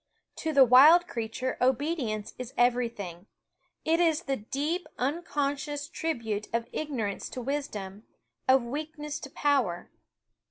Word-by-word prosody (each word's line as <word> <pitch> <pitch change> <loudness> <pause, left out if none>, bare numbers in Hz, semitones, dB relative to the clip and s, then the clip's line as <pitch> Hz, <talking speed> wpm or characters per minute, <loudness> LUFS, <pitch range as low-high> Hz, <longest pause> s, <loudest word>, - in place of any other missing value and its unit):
To 320 - -2
the 275 -3 +7
wild 290 +8 +8
s 350 - -24
creature 230 +3 -3
obedience 255 -4 0
is 250 0 -7
everything. 230 -7 0 0.6
It 330 +1 +3
is 330 -1 +2
the 270 -3 -1
/x^~ 210 - -17
deep, 315 +6 -1
unconscious 290 0 -2
tribute 230 -11 -3
of 230 0 -1
ignorance 240 -10 -3
to - - -6
wisdom, 225 -7 -4 0.4
of 260 -1 +5
weakness 300 +3 -5
to 275 - -8
power. 260 -12 0
270 Hz, 130 wpm, -28 LUFS, 230-300 Hz, 0.6 s, wild